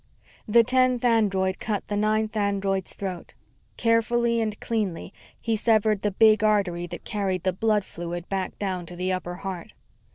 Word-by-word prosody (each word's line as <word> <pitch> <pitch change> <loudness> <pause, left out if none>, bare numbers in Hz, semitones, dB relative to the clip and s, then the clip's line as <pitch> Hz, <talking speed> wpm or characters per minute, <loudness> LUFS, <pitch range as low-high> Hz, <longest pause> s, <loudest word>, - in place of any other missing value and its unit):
The 230 +2 +6
tenth 255 0 +2
android 195 -5 +2
cut 210 -3 -3
the 205 - -2
ninth 215 +1 0
android's 200 -2 0
throat. 185 -3 -6 0.4
Carefully 235 0 +2
and 215 -2 -3
cleanly, 200 -6 -3 0.3
he 225 -1 -1
severed 215 -2 +2
the 210 - +1
big 215 +1 +4
artery 195 -5 +1
that - - -9
carried 190 -4 -2
the 185 -1 +1
blood 210 +1 +1
fluid 175 +1 -6
back 195 -1 -3
down 185 -4 -3
to 175 - -7
the 185 +1 -1
upper 175 -1 -4
heart. 190 +1 -7
205 Hz, 160 wpm, -25 LUFS, 185-220 Hz, 0.4 s, The